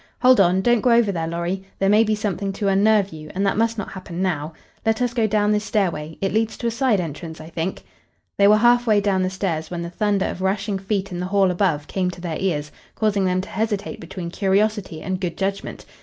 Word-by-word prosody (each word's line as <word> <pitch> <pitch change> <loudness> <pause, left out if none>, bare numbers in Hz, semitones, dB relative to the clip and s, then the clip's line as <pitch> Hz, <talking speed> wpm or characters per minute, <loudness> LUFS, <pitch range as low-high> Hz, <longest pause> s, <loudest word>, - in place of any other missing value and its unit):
Hold 255 -2 +6
on! 185 0 +4
Don't 240 0 +3
go 250 - +2
over 235 -3 +4
there, 165 -3 -2
Lorry. 170 +3 -2 0.2
There 195 - +1
may 210 +3 +5
be 215 -1 +1
something 200 -2 -2
to 200 0 -2
unnerve 200 -1 +3
you, 155 -1 -9
and 195 +2 0
that 195 - +1
must 230 +1 +1
not 210 - -4
happen 185 -3 -7
now. 165 -5 -1 0.3
Let 225 0 +1
us 245 -1 0
go 230 -3 +2
down 210 0 +2
this 210 0 +1
stairway 165 -8 -1
it 195 -1 0
leads 220 +1 0
to - - -6
a 235 - +1
side 235 -3 +2
entrance, 160 -1 -6
I 155 +1 -10
think." 165 +3 -3 0.5
They 200 - +5
were 210 +1 +6
half 240 +2 +4
way 210 -2 +5
down 200 -2 +1
the 185 - +1
stairs 180 -5 -3
when 175 -1 -4
the 170 - -6
thunder 200 +1 +1
of 185 - -4
rushing 195 +1 -1
feet 195 0 -2
in 175 - -4
the 180 - -2
hall 195 -1 +3
above 175 -5 0
came 185 -2 -1
to 175 -1 -8
their 170 -3 -3
ears, 150 -6 -1 0.2
causing 205 -3 +1
them 185 0 +1
to 190 - -10
hesitate 210 -1 -2
between 170 0 -7
curiosity 200 -3 0
and 185 0 -3
good 175 -3 -3
judgment. 195 0 -3
195 Hz, 240 wpm, -22 LUFS, 175-210 Hz, 0.5 s, Hold